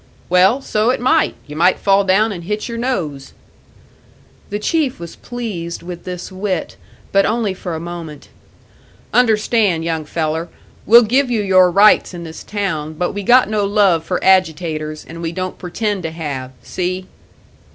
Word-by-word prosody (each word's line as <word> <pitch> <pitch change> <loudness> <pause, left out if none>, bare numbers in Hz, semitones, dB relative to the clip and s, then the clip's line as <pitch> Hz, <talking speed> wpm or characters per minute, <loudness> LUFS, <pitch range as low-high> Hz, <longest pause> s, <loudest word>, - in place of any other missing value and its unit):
"Well, 190 +9 +4
so 215 -1 +1
it 255 - +1
might 260 +6 +2
you 150 - -9
might 175 +4 +3
fall 200 0 +3
down 200 +4 +2
and 175 -4 -7
hit 210 +3 -3
your 230 -1 -5
nose." 160 - -3 1.2
The 205 - -2
Chief 275 - -1
was 170 -1 -8
pleased 200 -10 -6
with 175 0 -8
this 180 +1 -6
wit, 185 -2 -3 0.4
but 195 0 +4
only 215 -2 0
for 180 -2 -5
a - - -4
moment. 165 -3 -8 0.9
"Understand, 215 -7 +2
young 160 -2 -2
feller, 160 +2 -2 0.4
we'll 235 +3 +8
give 255 +4 +2
you 225 -4 0
your 185 -2 +5
rights 200 0 +4
in 170 - -7
this 160 -1 -9
town, 160 -7 -3
but 175 +3 -2
we 205 - -4
got 245 +5 +5
no 215 -1 0
love 200 -5 +3
for 180 +2 -2
agitators, 160 -4 +1
and 165 +1 -9
we 165 -1 -3
don't 185 +1 -5
pretend 205 +2 -2
to 165 - -3
have. 145 -6 -5
See?" 185 +1 -3
185 Hz, 165 wpm, -18 LUFS, 165-210 Hz, 1.2 s, we'll